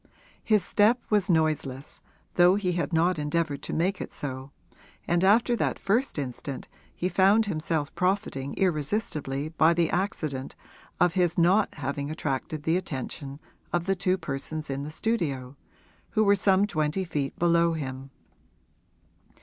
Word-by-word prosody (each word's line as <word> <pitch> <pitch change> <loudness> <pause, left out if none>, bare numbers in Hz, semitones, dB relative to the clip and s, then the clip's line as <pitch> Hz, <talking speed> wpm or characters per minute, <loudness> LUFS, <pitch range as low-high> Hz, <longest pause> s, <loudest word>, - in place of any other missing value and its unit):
His 215 -4 +3
step 220 +4 +3
was 210 -2 +3
noiseless, 155 -5 0 0.3
though 180 +1 +5
he 195 -3 0
had 175 0 -2
not 165 +1 +2
endeavoured 150 -1 -1
to - - -6
make 185 +4 0
it - - -6
so, 130 -1 -6 0.6
and 175 +1 +2
after 230 +5 +4
that - - -1
first 225 +5 0
instant 135 0 -5 0.3
he 180 - -1
found 195 +4 +4
himself 155 -4 -2
profiting 180 -8 -1
irresistibly 155 -5 -1
by 160 +1 +3
the 170 -1 +1
accident 155 -8 -2 0.4
of 175 -2 +4
his 175 -2 +1
not 185 +5 +3
having 140 0 -3
attracted 150 0 -3
the 160 +3 +2
attention 140 -3 -5 0.3
of 175 -1 0
the 195 0 +1
two 185 0 +1
persons 155 -1 -4
in 135 +1 -3
the 145 - -5
studio, 145 - -2 0.5
who 215 - +2
were 200 -1 +5
some 195 0 +3
twenty 155 -1 -1
feet 145 -6 -3
below 170 0 +3
him. 135 -3 -5
165 Hz, 145 wpm, -27 LUFS, 145-190 Hz, 0.6 s, though